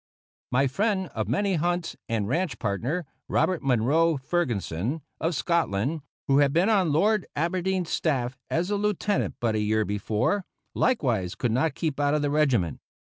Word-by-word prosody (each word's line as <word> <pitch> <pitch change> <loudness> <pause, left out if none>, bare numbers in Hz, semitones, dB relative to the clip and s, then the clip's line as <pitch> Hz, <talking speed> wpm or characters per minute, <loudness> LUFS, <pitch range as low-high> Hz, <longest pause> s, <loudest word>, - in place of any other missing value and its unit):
My 135 +2 +3
friend 190 - 0
of 110 -2 -2
many 195 - +1
hunts 175 +1 -1
and 110 -3 0
ranch 165 - -1
partner, 125 - -2 0.2
Robert 185 -3 +1
Munro 140 +6 +2
Ferguson, 130 - -2 0.2
of 165 +1 0
Scotland, 155 - 0 0.3
who 135 +1 +4
had 140 -1 +4
been 175 +8 +3
on 190 -7 +3
Lord 205 +7 +2
Aberdeen's 180 +2 -1
staff 130 -5 0
as 175 +4 0
a 205 - +1
Lieutenant 205 0 0
but 115 -2 +1
a 110 - 0
year 110 +1 +1
before, 105 - 0 0.3
likewise 120 - +1
could 120 - -1
not 135 +5 +1
keep 155 -4 -2
out 145 +1 +2
of 150 - 0
the 145 - 0
regiment. 130 - +2
150 Hz, 160 wpm, -26 LUFS, 120-175 Hz, 0.3 s, who